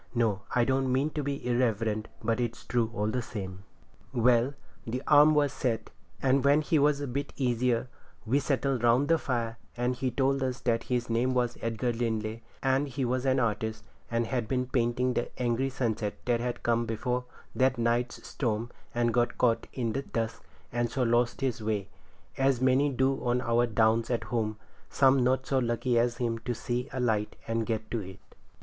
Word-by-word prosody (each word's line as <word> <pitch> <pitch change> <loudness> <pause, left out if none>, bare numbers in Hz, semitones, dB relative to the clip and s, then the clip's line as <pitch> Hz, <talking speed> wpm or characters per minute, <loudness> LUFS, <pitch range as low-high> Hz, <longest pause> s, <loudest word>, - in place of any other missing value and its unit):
No, 110 -5 +1
I 120 -1 +4
don't 130 0 +1
mean 135 +4 +1
to 150 - -2
be 140 -1 -3
irreverent, 115 -3 0 0.2
but 115 +2 +1
it's 120 -1 -3
true, 120 -2 +1
all 105 -2 -2
the 125 - -1
same. 95 -5 -7 0.5
Well, 125 +2 +3 0.3
the 125 +4 -4
arm 150 +1 +6
was 145 -2 +2
set, 120 -5 -2 0.3
and 135 0 +3
when 140 +2 +5
he 155 0 +2
was 145 0 +3
a - - -1
bit 140 +3 -3
easier 125 -2 +1 0.4
we 130 +6 +2
settled 135 -3 0
round 120 +5 +4
the 165 -1 +4
fire, 115 -4 -2 0.2
and 125 +1 0
he 130 +1 -1
told 135 +2 +1
us 130 -1 -1
that 115 -2 0
his 125 -1 0
name 120 +3 +1
was 120 -1 +1
Edgar 115 +2 -1
Linley, 110 -1 -2 0.2
and 135 +2 +2
he 135 -1 -2
was 125 +2 -1
an 130 0 +3
artist, 110 -1 -1 0.3
and 115 0 0
had 120 -1 -2
been 125 0 0
painting 125 0 +1
the 120 - -1
angry 125 +2 +1
sunset 115 -5 -2
that 120 -1 +2
had 120 0 -3
come 115 0 +1
before 125 +3 -2 0.3
that 130 0 +2
night's 120 +1 0
storm, 115 -2 -2 0.2
and 120 -1 +2
got 120 -1 +1
caught 115 -2 +2
in 115 -4 -2
the 135 - -1
dusk 115 -4 -3 0.3
and 120 0 0
so 130 +2 0
lost 120 +2 +1
his 130 -4 -1
way, 105 -2 -2 0.5
as 135 -2 +3
many 130 +3 +3
do 135 0 0
on 125 0 +1
our 120 0 +2
Downs 115 0 +2
at 120 -2 0
home, 110 -3 -2 0.3
some 135 -1 +4
not 130 +1 +2
so 135 0 +1
lucky 120 0 +1
as 120 0 +1
him 115 -2 -1
to 120 +1 -3
see 125 +1 -3
a 130 - -4
light 110 -4 0
and 115 0 -1
get 110 -2 -3
to 115 - 0
it. 95 -2 -8
120 Hz, 195 wpm, -29 LUFS, 115-130 Hz, 0.5 s, arm